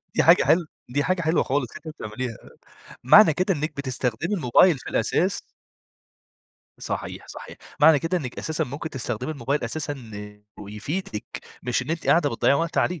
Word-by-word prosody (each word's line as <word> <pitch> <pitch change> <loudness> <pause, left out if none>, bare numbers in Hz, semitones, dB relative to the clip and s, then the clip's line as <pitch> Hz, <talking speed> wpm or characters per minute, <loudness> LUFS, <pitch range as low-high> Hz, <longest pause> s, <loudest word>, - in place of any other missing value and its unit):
دي - - +3
حاجة - - +6
حل 170 -1 +3 0.2
دي 145 +3 0
حاجة 185 +2 0
حلوة 160 0 +2
خلاص، 135 -1 -1 0.2
أنتِ - - -9
بتعمليها. 125 -5 -5 0.7
معنى 160 - +7
كده 185 +5 +1
إنِّك 155 0 -3
بتستخدمي 130 - -2
الموبايل 160 +1 +4
في - - -8
الأساس 185 +3 0 1.4
صحيح - - -5
صحيح، - - -10 0.2
معنى 150 0 +7
كده 165 +5 -1
إنِّك 130 -6 -7
أساسًا 160 -1 -1
ممكن 145 +5 -6
تستخدمي 125 +1 -4
الموبايل 140 0 -2
أساسًا 145 +5 -3 0.6
ويفيدِك، 105 - -5 0.4
مش 125 0 0
إن 130 - -6
أنتِ 165 0 -3
قاعدة 160 -4 +4
بتضيّعي 115 +4 +2
وقت 165 +3 -1
عليه، 180 -2 +1
145 Hz, 155 wpm, -24 LUFS, 125-165 Hz, 1.4 s, معنى